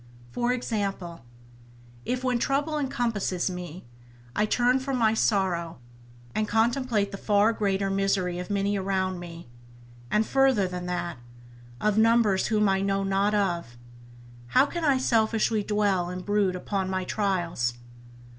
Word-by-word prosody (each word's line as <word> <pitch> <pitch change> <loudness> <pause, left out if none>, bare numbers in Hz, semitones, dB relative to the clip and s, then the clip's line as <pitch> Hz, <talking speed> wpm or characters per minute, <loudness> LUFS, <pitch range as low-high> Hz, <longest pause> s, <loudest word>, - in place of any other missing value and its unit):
For 240 - 0
example, 200 - -3 0.8
if, 255 +1 -2
when 250 -2 +1
trouble 290 +4 0
encompasses 225 -9 -1
me, 180 -1 -7 0.5
I 210 - +2
turn 245 +3 +2
from 265 0 -2
my 220 -2 +3
sorrow, 185 -7 0 0.6
and 215 - 0
contemplate 225 -2 +1
the 195 - -7
far 210 +2 +3
greater 195 -2 0
misery 195 -2 0
of 180 - -6
many 200 0 0
around 190 -1 -1
me, 170 -3 -9 0.6
and 215 +1 +2
further 265 -7 +3
than 180 0 -5
that, 175 -3 -3 0.6
of 210 0 +2
numbers 225 -4 +3
whom 210 -2 +2
I 195 0 +2
know 195 0 0
not 195 +2 +1
of, 170 - -1 0.7
how 260 - +4
can 340 +3 -5
I 280 -4 +4
selfishly 225 -3 +1
dwell 200 -4 0
and 180 0 -6
brood 205 -3 +1
upon 190 +1 -2
my 185 0 -1
trials. 175 - -1
200 Hz, 140 wpm, -26 LUFS, 185-225 Hz, 0.8 s, how